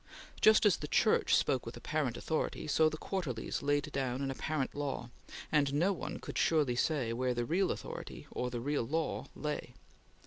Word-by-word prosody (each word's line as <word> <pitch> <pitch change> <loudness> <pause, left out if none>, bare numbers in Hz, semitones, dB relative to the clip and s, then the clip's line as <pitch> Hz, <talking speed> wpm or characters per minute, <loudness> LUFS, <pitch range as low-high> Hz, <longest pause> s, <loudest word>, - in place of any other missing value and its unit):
Just 215 0 +6
as 205 - +5
the 150 - -5
Church - - +3
spoke 130 - +2
with 115 - -7
apparent 145 -6 -1
authority, 160 -1 -2
or 160 0 +6
the 155 - -6
quarterlies 150 - -3
laid 145 0 0
down 130 -1 -1
an 135 - -1
apparent 145 0 -2
law, 140 -4 -3 0.4
and 145 -2 +3
no 180 +7 +3
one 180 - -5
could - - -5
surely 150 -7 +3
say 125 -3 +1
where 125 +1 0
the 120 0 0
real 185 +7 +1
authority, - - -6
or 125 - -2
the 120 -1 -4
real 145 +3 0
law, 155 +7 -2
lay. 150 -5 -4
145 Hz, 180 wpm, -33 LUFS, 125-155 Hz, 0.4 s, Just